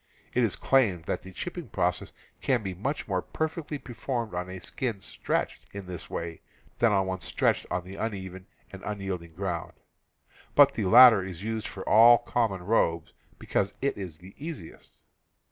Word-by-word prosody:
It 125 Hz, -, +2 dB
is 110 Hz, -5 st, +1 dB
claimed 110 Hz, -11 st, +2 dB
that -, -, -2 dB
the 95 Hz, -, -11 dB
chipping 175 Hz, -, -6 dB
process 90 Hz, -2 st, -1 dB, 0.3 s
can 125 Hz, -5 st, +1 dB
be 95 Hz, -2 st, -3 dB
much 130 Hz, -, -3 dB
more 95 Hz, -3 st, 0 dB
perfectly 155 Hz, -, -3 dB
performed 120 Hz, -3 st, -4 dB
on 90 Hz, +1 st, -3 dB
a 95 Hz, -, -6 dB
skin 115 Hz, +1 st, -3 dB
stretched -, -, -3 dB
in 100 Hz, -1 st, -6 dB
this 90 Hz, -2 st, -7 dB
way 85 Hz, -1 st, -5 dB, 0.4 s
than 115 Hz, -2 st, +4 dB
on 95 Hz, -2 st, +2 dB
one 95 Hz, 0 st, -3 dB
stretched 80 Hz, -, 0 dB
on 90 Hz, 0 st, -1 dB
the 95 Hz, +2 st, -10 dB
uneven 95 Hz, -3 st, -5 dB, 0.2 s
and 95 Hz, -1 st, -9 dB
unyielding 95 Hz, -5 st, -5 dB
ground, 90 Hz, -3 st, -3 dB, 0.8 s
but -, -, +7 dB
the -, -, -2 dB
latter 120 Hz, -1 st, +9 dB
is 95 Hz, 0 st, -7 dB
used 110 Hz, 0 st, -3 dB
for 95 Hz, -, -8 dB
all 115 Hz, +2 st, +8 dB
common 115 Hz, -6 st, -1 dB
robes, 85 Hz, -5 st, +1 dB, 0.2 s
because 100 Hz, 0 st, -1 dB
it 140 Hz, -, 0 dB
is 90 Hz, -6 st, -7 dB
the 90 Hz, +4 st, -14 dB
easiest. 155 Hz, -, -9 dB
100 Hz, 170 wpm, -28 LUFS, 90-120 Hz, 0.8 s, latter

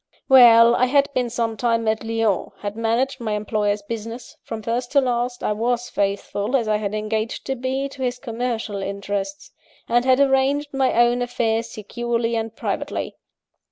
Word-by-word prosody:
"Well: 235 Hz, -3 st, +8 dB
I 255 Hz, -, +3 dB
had 280 Hz, +2 st, +2 dB
been 250 Hz, -2 st, 0 dB
some 230 Hz, -1 st, -2 dB
time 230 Hz, +1 st, 0 dB
at 220 Hz, +1 st, 0 dB
Lyons; 225 Hz, -3 st, -1 dB
had 205 Hz, 0 st, -4 dB
managed 235 Hz, +4 st, 0 dB
my 220 Hz, -3 st, -2 dB
employer's 210 Hz, -1 st, -1 dB
business 230 Hz, +3 st, -7 dB
(from 220 Hz, -1 st, -7 dB
first 240 Hz, +3 st, -2 dB
to 285 Hz, -, +6 dB
last, 245 Hz, -1 st, -1 dB
I -, -, 0 dB
was 240 Hz, +3 st, -1 dB
faithful, 200 Hz, +3 st, -1 dB
as 235 Hz, -4 st, +1 dB
I 215 Hz, 0 st, +2 dB
had 210 Hz, 0 st, -3 dB
engaged 215 Hz, +2 st, -3 dB
to 270 Hz, -, -2 dB
be, 260 Hz, +2 st, -2 dB
to 275 Hz, -1 st, -11 dB
his 250 Hz, -1 st, -1 dB
commercial 230 Hz, -4 st, -3 dB
interests); 200 Hz, -, -4 dB, 0.4 s
and 240 Hz, +1 st, +2 dB
had 260 Hz, 0 st, +3 dB
arranged 280 Hz, +1 st, +2 dB
my 270 Hz, -1 st, +2 dB
own 240 Hz, +1 st, +3 dB
affairs 230 Hz, -2 st, -1 dB
securely 235 Hz, +2 st, -2 dB
and 225 Hz, 0 st, -3 dB
privately. -, -, -3 dB
235 Hz, 170 wpm, -22 LUFS, 220-255 Hz, 0.4 s, Well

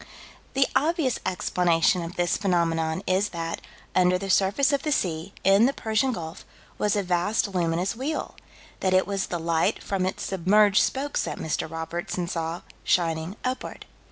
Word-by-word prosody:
The 270 Hz, 0 st, +5 dB
obvious 310 Hz, -4 st, +1 dB
explanation 180 Hz, -1 st, +2 dB
of 170 Hz, +1 st, -6 dB
this 175 Hz, 0 st, +1 dB
phenomenon 165 Hz, -2 st, 0 dB
is 190 Hz, +3 st, +1 dB
that, 165 Hz, -1 st, -4 dB, 0.3 s
under 180 Hz, 0 st, +4 dB
the 195 Hz, +1 st, -3 dB
surface 205 Hz, +10 st, +3 dB
of 280 Hz, -, +1 dB
the 305 Hz, -, -2 dB
sea, 175 Hz, -, -1 dB
in 195 Hz, +5 st, +6 dB
the 275 Hz, -, 0 dB
Persian 220 Hz, +3 st, 0 dB
Gulf, 165 Hz, -5 st, -6 dB, 0.4 s
was 210 Hz, 0 st, +2 dB
a 205 Hz, -, +1 dB
vast 180 Hz, +4 st, +1 dB
luminous 175 Hz, +3 st, 0 dB
wheel: 275 Hz, +6 st, -3 dB, 0.5 s
that 185 Hz, -1 st, +2 dB
it 185 Hz, -, +4 dB
was 195 Hz, -1 st, -2 dB
the 175 Hz, -, -3 dB
light 165 Hz, 0 st, 0 dB
from 190 Hz, -2 st, -1 dB
its 190 Hz, -, -4 dB
submerged 200 Hz, +3 st, +4 dB
spokes 280 Hz, +2 st, -1 dB
that -, -, -4 dB
Mr. 160 Hz, 0 st, -2 dB
Robertson 170 Hz, +2 st, -4 dB
saw, 165 Hz, -1 st, -3 dB, 0.2 s
shining 165 Hz, +1 st, 0 dB
upward. 255 Hz, +1 st, -4 dB
185 Hz, 160 wpm, -26 LUFS, 170-210 Hz, 0.5 s, in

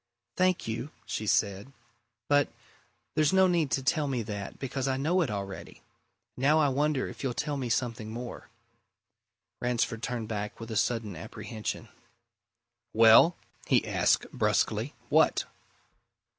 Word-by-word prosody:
"Thank 185 Hz, -5 st, +1 dB
you," 115 Hz, +5 st, -3 dB, 0.2 s
she 110 Hz, -, -4 dB
said. 100 Hz, +5 st, +1 dB, 0.6 s
"But 145 Hz, -1 st, +3 dB, 0.6 s
there's 155 Hz, -2 st, +3 dB
no 190 Hz, 0 st, +6 dB
need 170 Hz, -5 st, +2 dB
to 135 Hz, -, 0 dB
tell 145 Hz, +2 st, +1 dB
me 125 Hz, -4 st, -1 dB
that, 100 Hz, -2 st, -6 dB
because 135 Hz, 0 st, -3 dB
I 130 Hz, -1 st, 0 dB
know 165 Hz, +7 st, +2 dB
it 155 Hz, -, 0 dB
already. 100 Hz, -2 st, -6 dB, 0.5 s
Now 140 Hz, +5 st, +3 dB
I 150 Hz, -2 st, +4 dB
wonder 145 Hz, 0 st, 0 dB
if -, -, -9 dB
you'll 130 Hz, -3 st, -2 dB
tell 150 Hz, +3 st, -2 dB
me 130 Hz, -3 st, -3 dB
something 115 Hz, -2 st, -1 dB
more?" 120 Hz, +2 st, -7 dB, 1.1 s
Ransford 120 Hz, -2 st, 0 dB
turned 120 Hz, -3 st, -3 dB
back 105 Hz, -1 st, -4 dB
with 115 Hz, 0 st, -7 dB
a -, -, -3 dB
sudden 110 Hz, -3 st, 0 dB
apprehension. 110 Hz, +6 st, -6 dB, 1.1 s
"Well?" 115 Hz, +10 st, +7 dB, 0.3 s
he -, -, +3 dB
asked -, -, +2 dB
brusquely. -, -, 0 dB
"What?" -, -, +3 dB
125 Hz, 140 wpm, -29 LUFS, 110-145 Hz, 1.1 s, Well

